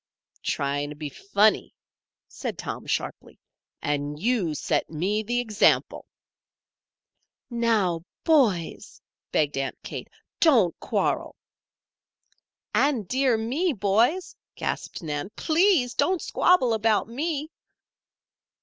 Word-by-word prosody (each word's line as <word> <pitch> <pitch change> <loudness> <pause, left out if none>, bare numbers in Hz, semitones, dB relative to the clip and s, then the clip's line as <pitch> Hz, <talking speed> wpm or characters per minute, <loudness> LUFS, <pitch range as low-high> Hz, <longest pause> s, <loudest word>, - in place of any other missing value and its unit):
"Trying 145 +1 -1
to 150 - -8
be 150 0 -5
funny," 200 +8 +1 0.5
said - - -5
Tom, - - -6
sharply. - - -4 0.4
"And 145 0 -2
you 200 -7 0
set - - -1
me 185 +7 -1
the 240 +3 -1
example." 220 -4 +2 1.4
"Now, 220 -8 +1 0.2
boys!" 235 - +1 0.3
begged 145 -2 +1
Aunt 135 - -3
Kate. - - -6 0.3
"Don't 235 - +5
quarrel." - - -1 1.4
"And, 260 -9 +2
dear 260 +1 +2
me, 280 +10 0
boys," 225 - +1 0.2
gasped - - -4
Nan, 150 +3 -3
"please 320 -6 +3
don't 370 -1 +1
squabble 260 -10 +3
about 220 -1 +2
me." 300 +5 -3
220 Hz, 100 wpm, -25 LUFS, 165-270 Hz, 1.4 s, Don't